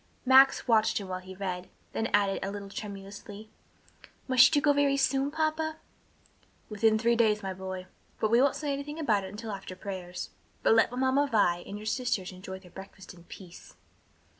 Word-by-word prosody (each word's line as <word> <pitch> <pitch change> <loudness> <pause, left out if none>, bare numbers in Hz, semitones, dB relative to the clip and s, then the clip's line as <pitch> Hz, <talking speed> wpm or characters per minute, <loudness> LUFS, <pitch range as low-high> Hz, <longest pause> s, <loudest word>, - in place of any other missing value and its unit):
Max 265 +1 +6
watched 225 -2 +3
him 200 - -4
while 185 0 -3
he 185 +1 -11
read, 185 -2 -5 0.2
then 225 - -1
asked, 200 -1 +1
a 195 - -2
little 200 0 -7
tremulously, 205 +1 -9 0.8
"Must 255 +3 +6
you - - +5
go 290 0 +3
very 280 -1 +2
soon, 275 0 +1
papa?" 315 +1 -1 0.9
"Within 220 +1 +2
three 235 +2 +2
days, 215 -3 +2
my 190 -1 -3
boy. 185 0 -6 0.3
But 215 - 0
we 235 +2 +5
won't 275 0 +3
say 290 -2 -2
anything 285 +2 -5
about 220 -11 +1
it - - -7
until 215 +2 -7
after 195 -2 -7
prayers, 185 -2 -6 0.3
but - - +5
let 225 +1 +4
Mamma 260 +3 +1
Vi 175 -5 +3
and 205 - -6
your 210 - -9
sisters 220 -5 -1
enjoy 190 +1 -8
their 185 -2 -17
breakfast 190 0 -11
in 170 -1 -17
peace." 180 -1 -13
215 Hz, 185 wpm, -29 LUFS, 190-260 Hz, 0.9 s, Max